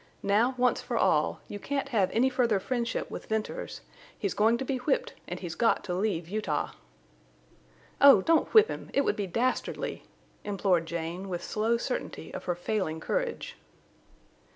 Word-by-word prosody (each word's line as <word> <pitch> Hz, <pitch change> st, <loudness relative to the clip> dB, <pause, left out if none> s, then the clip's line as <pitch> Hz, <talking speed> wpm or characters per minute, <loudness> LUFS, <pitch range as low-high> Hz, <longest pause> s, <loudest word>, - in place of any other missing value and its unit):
Now, 225 Hz, +6 st, +3 dB
once 250 Hz, 0 st, +2 dB
for -, -, -3 dB
all, -, -, +2 dB
you 205 Hz, -, -6 dB
can't 275 Hz, +4 st, -2 dB
have 205 Hz, -7 st, +2 dB
any 245 Hz, +4 st, +3 dB
further 245 Hz, -5 st, +2 dB
friendship 235 Hz, +2 st, -2 dB
with -, -, -7 dB
Venters. 220 Hz, -, -3 dB, 0.4 s
He's 200 Hz, -3 st, -2 dB
going 225 Hz, +3 st, +3 dB
to 265 Hz, -, -4 dB
be 265 Hz, 0 st, -1 dB
whipped, 265 Hz, +2 st, 0 dB
and 180 Hz, 0 st, -5 dB
he's 175 Hz, -3 st, -5 dB
got 230 Hz, +5 st, +2 dB
to 180 Hz, -, -3 dB
leave 180 Hz, -3 st, -1 dB
Utah!" 195 Hz, -6 st, -2 dB, 1.3 s
"Oh! 275 Hz, -9 st, +8 dB
Don't 325 Hz, -1 st, +3 dB
whip 435 Hz, 0 st, +7 dB
him! -, -, -6 dB
It 280 Hz, -, +5 dB
would -, -, +1 dB
be 200 Hz, -2 st, -2 dB
dastardly!" 240 Hz, +8 st, -1 dB, 0.4 s
implored 190 Hz, -5 st, +1 dB
Jane, 170 Hz, +3 st, -4 dB
with 175 Hz, -2 st, -4 dB
slow 225 Hz, +2 st, +1 dB
certainty -, -, -4 dB
of -, -, -6 dB
her 175 Hz, -, 0 dB
failing 175 Hz, -3 st, -2 dB
courage. -, -, -3 dB
215 Hz, 165 wpm, -29 LUFS, 185-255 Hz, 1.3 s, Oh